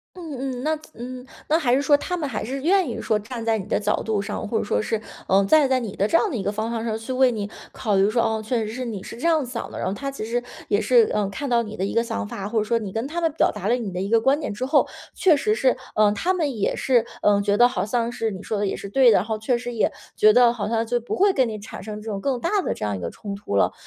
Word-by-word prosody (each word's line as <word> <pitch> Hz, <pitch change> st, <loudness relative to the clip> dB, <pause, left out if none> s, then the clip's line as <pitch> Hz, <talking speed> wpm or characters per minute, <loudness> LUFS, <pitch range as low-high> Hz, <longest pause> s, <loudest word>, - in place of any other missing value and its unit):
嗯 325 Hz, -7 st, -7 dB, 0.2 s
嗯。 -, -, -6 dB
那， 310 Hz, +1 st, +1 dB, 0.2 s
嗯， 250 Hz, +2 st, -8 dB, 0.2 s
那 315 Hz, -, +3 dB
还 255 Hz, -7 st, +2 dB
是 270 Hz, -, +3 dB
说 290 Hz, +1 st, +5 dB
他 360 Hz, +4 st, -3 dB
们 305 Hz, -4 st, -2 dB
还 225 Hz, -6 st, -3 dB
是 265 Hz, +5 st, -4 dB
愿 365 Hz, 0 st, +3 dB
意 235 Hz, -, -4 dB
说 215 Hz, -, +1 dB
站 230 Hz, +3 st, -6 dB
在 225 Hz, -1 st, +2 dB
你 195 Hz, -, -5 dB
的 -, -, 0 dB
角 210 Hz, 0 st, 0 dB
度 215 Hz, -2 st, 0 dB
上， 205 Hz, +1 st, -4 dB
或 225 Hz, -, -1 dB
者 -, -, 0 dB
说 205 Hz, -, 0 dB
是， 215 Hz, 0 st, -2 dB, 0.3 s
呃， 195 Hz, +1 st, +4 dB
站 305 Hz, +5 st, +5 dB
在 260 Hz, -1 st, +3 dB
你 220 Hz, -5 st, -5 dB
的 200 Hz, -, +1 dB
这 330 Hz, -, +4 dB
样 425 Hz, -, +1 dB
的 275 Hz, -, -4 dB
一 200 Hz, -, -2 dB
个 200 Hz, -, 0 dB
方 215 Hz, +2 st, -3 dB
向 230 Hz, -1 st, -3 dB
上 220 Hz, -1 st, -1 dB
去 240 Hz, +4 st, -5 dB
为 255 Hz, 0 st, +4 dB
你 210 Hz, -3 st, -4 dB, 0.2 s
考 210 Hz, -2 st, -1 dB
虑 195 Hz, +2 st, +4 dB
说， 235 Hz, +2 st, +2 dB
哦， 220 Hz, -1 st, 0 dB
确 245 Hz, +3 st, 0 dB
实 215 Hz, -, -5 dB
是 255 Hz, -, -4 dB
你 215 Hz, -5 st, -5 dB
是 -, -, -9 dB
这 245 Hz, -, -6 dB
样 320 Hz, -4 st, +3 dB
想 240 Hz, -1 st, -6 dB
的。 -, -, -7 dB
然 -, -, -1 dB
后 190 Hz, -, -1 dB
他 275 Hz, +6 st, -4 dB
其 245 Hz, -5 st, -5 dB
实 240 Hz, +2 st, -1 dB, 0.2 s
也 -, -, +2 dB
是， 465 Hz, -3 st, +4 dB
呃， 210 Hz, -2 st, +1 dB
看 280 Hz, +8 st, -5 dB
到 235 Hz, -1 st, +3 dB
你 215 Hz, -1 st, -8 dB
的 190 Hz, -, -1 dB
一 -, -, -3 dB
个 230 Hz, -, +2 dB
想 100 Hz, -, -3 dB
法， 195 Hz, -, -5 dB
或 230 Hz, -, -2 dB
者 -, -, +1 dB
说 235 Hz, +2 st, +1 dB
你 210 Hz, -4 st, -5 dB
跟 225 Hz, +6 st, -2 dB
他 340 Hz, +4 st, -3 dB
们 330 Hz, -1 st, +2 dB
表 -, -, +2 dB
达 195 Hz, -, -5 dB
了 235 Hz, -, +3 dB
你 235 Hz, -5 st, -3 dB
的 180 Hz, 0 st, -3 dB
一 195 Hz, -, -3 dB
个 230 Hz, -, +4 dB
观 270 Hz, +5 st, +3 dB
点 290 Hz, -, -4 dB
之 245 Hz, +5 st, -3 dB
后， 285 Hz, +2 st, +3 dB, 0.3 s
确 340 Hz, -5 st, +5 dB
实 425 Hz, +9 st, +1 dB
是， 260 Hz, -, +2 dB, 0.2 s
呃， 210 Hz, -1 st, +5 dB
他 345 Hz, -, 0 dB
们 300 Hz, -9 st, -1 dB
也 200 Hz, -, 0 dB
是， 245 Hz, -3 st, +2 dB, 0.2 s
呃， 205 Hz, -1 st, +4 dB
觉 200 Hz, 0 st, +1 dB
得 240 Hz, -, +7 dB
好 200 Hz, -6 st, -2 dB
像 235 Hz, +1 st, -1 dB
是 225 Hz, -2 st, -2 dB
你 195 Hz, 0 st, -7 dB
说 215 Hz, -, -2 dB
的 205 Hz, -, 0 dB
也 -, -, -2 dB
是 200 Hz, -, -7 dB
对 250 Hz, +2 st, +5 dB
的， -, -, +5 dB
然 180 Hz, -, +1 dB
后 220 Hz, 0 st, -3 dB
确 240 Hz, +3 st, +1 dB
实 245 Hz, 0 st, -5 dB
也 220 Hz, -, +1 dB, 0.2 s
觉 215 Hz, 0 st, +6 dB
得 245 Hz, 0 st, +6 dB
好 220 Hz, -4 st, -3 dB
像 225 Hz, +1 st, 0 dB
就 240 Hz, +1 st, 0 dB
不 235 Hz, -, -4 dB
会 395 Hz, +2 st, +4 dB
跟 260 Hz, -6 st, +2 dB
你 215 Hz, -, -4 dB
产 205 Hz, -, -9 dB
生 210 Hz, 0 st, -7 dB
这 220 Hz, -, -7 dB
种 200 Hz, -, -3 dB
更 260 Hz, +3 st, -1 dB
大 335 Hz, -, 0 dB
的 -, -, -1 dB
这 -, -, -4 dB
样 105 Hz, -, -1 dB
一 -, -, -7 dB
个 85 Hz, -1 st, -4 dB
冲 200 Hz, -2 st, -7 dB
突 200 Hz, -, -5 dB
了。 100 Hz, -, +3 dB
230 Hz, 345 characters per minute, -23 LUFS, 210-265 Hz, 0.3 s, 得